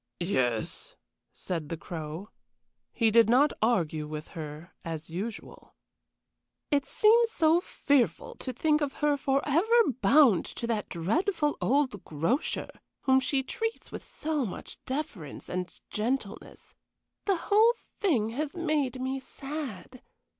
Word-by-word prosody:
"Yes," 125 - -1 0.4
said 165 -5 -4
the 165 - -3
Crow. 160 +4 -6 0.6
He 225 -2 +2
did 230 0 +6
not 275 +5 +5
argue 165 -9 +1
with 155 0 -6
her 155 +1 -8
as 160 -1 -6
usual. 205 +7 -7 1.0
"It 285 -1 +2
seems 460 +2 +5
so 325 -5 +4
fearful 285 - +1
to 260 - -4
think 300 +5 +2
of 285 -2 -1
her 295 -1 +2
forever 295 - +3
bound 275 - +6
to - - -6
that 225 -3 -2
dreadful 295 - 0
old 260 -7 +1
grocer, 165 - -1 0.3
whom 265 0 +4
she 265 +1 0
treats 450 - -4
with - - -7
so 305 -2 -2
much 200 - -7
deference 260 - -5
and 180 -1 -3 0.2
gentleness. 220 -1 -3 0.5
The 395 - +3
whole 435 +7 +4 0.2
thing 250 - +2
has 290 +7 -3
made 300 -6 0
me 260 +1 -2
sad. 265 - -7
260 Hz, 125 wpm, -29 LUFS, 185-300 Hz, 1.0 s, did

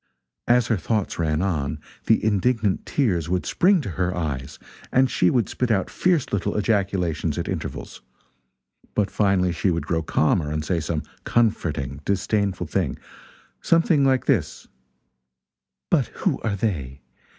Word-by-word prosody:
As 120 0 +4
her 115 -2 +1
thoughts 100 +2 -2
ran 80 0 +1
on, 75 -6 -1 0.3
the 110 - +3
indignant 110 -1 +1
tears 90 - 0
would 90 0 0
spring 185 -1 +3
to 120 - -5
her 90 +1 -1
eyes, 70 -6 -4 0.3
and 130 +1 +4
she 90 - +3
would 120 -6 +1
spit 125 - -2
out 100 -4 +1
fierce 175 -10 +1
little 100 +1 -1
ejaculations 95 -7 0
at - - -3
intervals. - - -5 0.9
But 100 -2 +1
finally 95 -3 +2
she 85 +3 0
would 85 -1 -1
grow 80 -1 0
calmer 80 0 +1
and 75 0 -2
say 85 +1 0
some 80 0 -2 0.2
comforting 75 - 0
disdainful 100 0 0
thing 80 -3 -1 0.6
something 165 -3 +3
like 130 -1 +2
this: 90 - 0 1.2
"But - - +3
who - - -2
are 105 -2 -1
they? 70 - -3
95 Hz, 145 wpm, -23 LUFS, 80-110 Hz, 1.2 s, As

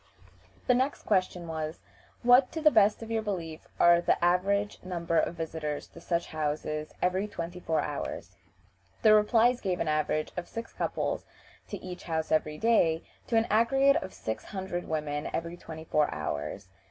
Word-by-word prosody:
The 250 - +4
next 260 +3 0
question 185 -3 0
was, 160 0 -4 0.4
"What, 245 +2 +6
to 320 - -2
the 305 -1 +5
best 210 -1 +4
of 225 - -8
your 225 -1 +1
belief, 170 -7 -5
are 170 0 +6
the - - +2
average 200 +3 +1
number 170 -2 0
of - - -1
visitors 160 -3 -4
to 170 - -13
such 170 0 -1
houses 155 0 -3
every 185 +3 +1
twenty 175 -3 -6
four 160 -2 0
hours?" - - -5 0.7
The 215 -1 +7
replies 230 +3 +4
gave 185 -3 -1
an - - -1
average 155 0 0
of 180 - -4
six 230 0 -7
couples - - -2 0.4
to - - -5
each 180 -1 -8
house 160 -2 -2
every 155 -1 +1
day, 170 -7 +3 0.3
or 230 - +4
an 225 - +3
aggregate 270 +6 +4
of 190 - -7
six 110 - -5
hundred 190 -3 -4
women 150 -2 -2
every 170 +1 -3
twenty 160 -2 -9
four 150 -2 +2
hours. 75 +2 -4
175 Hz, 170 wpm, -29 LUFS, 160-215 Hz, 0.7 s, The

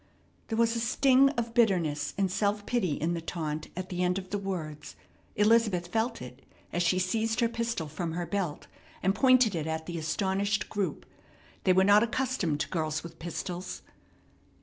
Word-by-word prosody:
There 220 - -2
was 230 0 +3
a - - 0
sting 260 +3 +4
of 230 -1 -2
bitterness 170 -11 +1
and 195 -2 +1
self 205 +1 0
pity 195 -10 0
in 165 +4 -1
the 170 - -3
taunt 155 -2 -4
at 185 0 -4
the 180 -1 -3
end 180 +1 +1
of 185 -1 -7
the 205 - -1
words. 165 -6 -5 0.4
Elizabeth 210 -5 +3
felt 225 - -1
it, 125 +1 -11 0.3
as 175 - 0
she 175 +1 +2
seized 220 +5 0
her 235 - +4
pistol 230 -7 -2
from 160 +2 -4
her 175 +1 -2
belt, 175 -3 -3 0.4
and 190 - +3
pointed 255 -3 +5
it 160 -2 -2
at 160 0 -3
the 170 -1 -4
astonished 195 +5 0
group. 205 -3 -2 0.6
They 185 - +5
were 190 +1 +5
not 205 +2 +6
accustomed 235 - 0
to - - -2
girls 155 -2 -2
with 165 -1 -10
pistols. 175 +2 -5
190 Hz, 180 wpm, -29 LUFS, 165-225 Hz, 0.6 s, not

